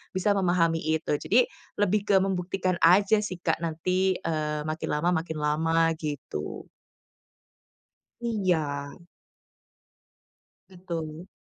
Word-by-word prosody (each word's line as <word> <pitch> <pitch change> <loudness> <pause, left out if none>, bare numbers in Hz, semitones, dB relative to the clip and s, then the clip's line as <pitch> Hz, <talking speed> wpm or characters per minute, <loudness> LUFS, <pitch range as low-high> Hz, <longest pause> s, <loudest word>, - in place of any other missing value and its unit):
bisa 185 +2 +2
memahami 175 -4 +2
itu. 160 0 -1
Jadi 245 +3 +3 0.4
lebih 205 +1 +1
ke 200 - +5
membuktikan 185 -1 -1
aja 200 +5 +5
sih 195 -4 -4
Kak, 160 - +1
nanti, 185 +3 0
eee, 150 -1 -2
makin 155 +1 -3
lama 170 +4 +1
makin 160 -1 -6
lama 165 +2 +2
gitu. 145 - -5 1.5
Iya. 170 -10 -1 1.7
Betul. 170 -2 -6
170 Hz, 100 wpm, -27 LUFS, 155-190 Hz, 1.7 s, ke